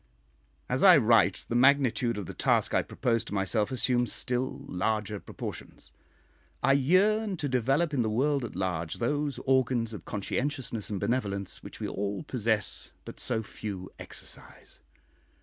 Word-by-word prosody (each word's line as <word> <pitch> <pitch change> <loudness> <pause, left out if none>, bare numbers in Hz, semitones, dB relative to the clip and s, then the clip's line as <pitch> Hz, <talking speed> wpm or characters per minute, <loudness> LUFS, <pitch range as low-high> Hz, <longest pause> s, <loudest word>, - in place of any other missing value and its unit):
As 125 - -1
I 185 -4 +9
write, 115 -3 +3
the - - -3
magnitude 125 -2 +3
of 100 - -4
the - - -7
task - - +1
I - - +4
propose 115 -3 -1
to 105 - -5
myself 100 +3 0
assumes 125 -2 +1
still 130 +2 -2
larger 105 +2 -1
proportions. - - -8 0.7
I 135 +2 +5
yearn 190 +8 +3
to 145 - -2
develop 135 +6 +1
in 135 - +2
the 110 - 0
world 140 +5 +1
at 115 - -6
large 90 -4 -2
those 145 +3 -1
organs 125 -3 +2
of 105 - -7
conscientiousness 120 +2 -3
and 100 -3 -3
benevolence 100 -6 -1
which - - -10
we - - -3
all 100 -1 -3
possess 110 -5 -1
but - - -9
so 110 - -1
few 100 -3 -7
exercise. - - -8
120 Hz, 150 wpm, -29 LUFS, 105-135 Hz, 0.7 s, I